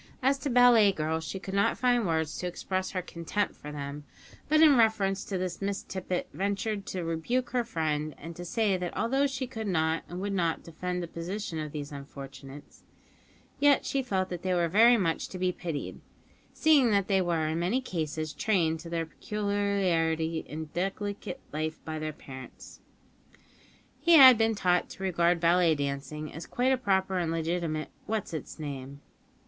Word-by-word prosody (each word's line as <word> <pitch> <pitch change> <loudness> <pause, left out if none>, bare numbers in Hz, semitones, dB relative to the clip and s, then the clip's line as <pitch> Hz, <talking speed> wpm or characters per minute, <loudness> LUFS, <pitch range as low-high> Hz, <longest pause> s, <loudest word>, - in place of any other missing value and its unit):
As 270 +1 +3
to 285 - -3
ballet 240 -4 +6
girls, 160 -2 -2
she 190 - -4
could 190 0 -7
not 200 0 +2
find 245 -4 +2
words 160 -2 0
to 180 - -2
express 185 +1 -3
her 185 -1 -3
contempt 175 +4 -2
for 150 - -9
them; 145 0 -6 0.5
but 310 +1 +4
in 310 -3 +7
reference 205 -4 +2
to 195 - -3
this 185 0 -4
Miss 200 0 -2
Tippet 185 -1 -3
ventured 200 +1 -2
to 185 -2 -3
rebuke 165 +11 -1
her 245 -1 +1
friend, 155 -8 -2
and 165 +2 -9
to 175 - -7
say 200 +1 +1
that 180 -1 -5
although 270 +6 +2
she 270 -1 -3
could 225 -4 -6
not 160 -3 +1
and 175 - -6
would 200 +1 -2
not 170 -4 0
defend 180 +2 -4
the - - -5
position 170 +1 -5
of 155 -1 -4
these 145 -1 -6
unfortunates, 140 0 -10 0.8
yet 285 -1 +4
she 275 - 0
felt 190 -7 -1
that 175 -1 -5
they 185 0 0
were 170 -1 +2
very 230 +7 +6
much 165 -6 -1
to 185 - -7
be 185 0 +1
pitied, 170 -4 -5 0.5
seeing 295 -6 +4
that 200 -2 +2
they 195 -2 +3
were 170 -3 0
in 160 +1 -1
many 185 +9 +1
cases 155 - -3
trained 170 -7 +1
to 165 +1 -9
their 165 -1 -1
peculiarly 180 -5 0
indelicate 190 +6 -4 0.2
life 155 +1 -3
by 155 -1 -4
their 155 0 -3
parents, 130 -3 -11 1.3
and 335 -2 +9
had 260 -2 +11
been 225 0 +2
taught 180 -3 +1
to 195 - -9
regard 175 -2 +2
ballet 170 -1 +4
dancing 140 +2 -4
as 160 +2 -8
quite 255 +2 +1
a - - +5
proper 190 -5 +1
and 170 -2 -1
legitimate 165 -1 -2 0.2
what's 215 -5 -2
its 160 - -6
name. 140 -2 -6
180 Hz, 180 wpm, -29 LUFS, 160-205 Hz, 1.3 s, had